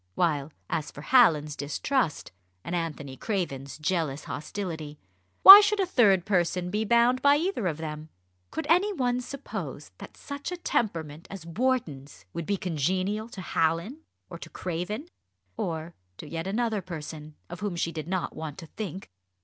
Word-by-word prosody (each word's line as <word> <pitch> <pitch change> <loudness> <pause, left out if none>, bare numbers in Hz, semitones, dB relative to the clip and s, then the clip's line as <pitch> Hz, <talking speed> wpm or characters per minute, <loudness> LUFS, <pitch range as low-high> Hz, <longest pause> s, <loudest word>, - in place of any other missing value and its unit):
While, 155 -4 0 0.2
as 155 - -2
for 145 - -10
Hallin's 155 - +4
distrust, 155 - -1 0.3
and - - -5
Anthony 150 -5 -4
Craven's 140 - -3
jealous 155 -3 -1
hostility, 160 -3 -5 0.5
why 395 +2 +14
should 415 0 +1
a 385 - +3
third 200 - +4
person 180 -2 0
be 210 +2 0
bound 235 +3 +3
by 285 0 +6
either 310 - -1
of 155 -4 -2
them? 155 -1 -6 0.4
Could 320 - -4
any 360 +6 +4
one 250 -8 0
suppose 270 +2 -7
that - - -11
such 285 +4 -6
a 360 - -4
temperament 165 - -2
as 195 -4 -8
Wharton's 165 - -2
would 170 - -5
be 200 - +1
congenial 185 +6 -1
to 195 - -8
Hallin 170 - 0 0.3
or - - -9
to - - -9
Craven 185 - -4 0.5
or 165 0 -4 0.2
to 155 - -9
yet 165 +3 -4
another 220 0 0
person, 155 -3 -8
of 175 - -8
whom 205 -3 -3
she 170 0 -1
did 155 -1 -6
not 185 0 -2
want 155 -3 -6
to 175 - -8
think? 190 +1 -7
180 Hz, 160 wpm, -27 LUFS, 155-235 Hz, 0.5 s, why